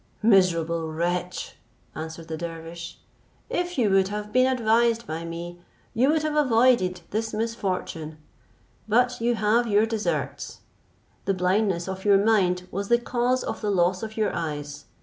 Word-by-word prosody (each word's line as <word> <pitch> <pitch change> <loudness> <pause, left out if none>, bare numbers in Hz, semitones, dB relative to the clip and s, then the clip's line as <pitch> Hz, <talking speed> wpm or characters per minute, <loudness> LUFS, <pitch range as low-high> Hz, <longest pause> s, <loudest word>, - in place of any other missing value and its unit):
"Miserable 170 -6 +3
wretch!" 175 +2 -3 0.4
answered 160 +1 -7
the 160 - -4
dervish, 165 0 -7 0.5
"if 355 0 -2
you 220 -6 +2
would 190 -1 +4
have 210 +1 -5
been 255 0 +5
advised 235 -1 +2
by 165 -3 -5
me, 170 +1 -7 0.3
you 255 +5 +3
would 310 0 +2
have 305 -1 -1
avoided 235 -9 +3
this 220 +1 -2
misfortune, 185 -8 -3 0.7
but 245 +2 +2
you 240 +1 +2
have 220 +2 +2
your 210 0 +4
deserts; 225 -1 -3 0.6
the 195 - +1
blindness 185 -1 +1
of 190 0 -5
your 200 -1 +5
mind 190 -4 +2
was 200 +1 -3
the 235 - +4
cause 245 +1 0
of - - -4
the 210 - -1
loss 185 -1 +2
of 220 0 -7
your 215 - +1
eyes. 145 -3 -5
200 Hz, 150 wpm, -25 LUFS, 170-230 Hz, 0.7 s, been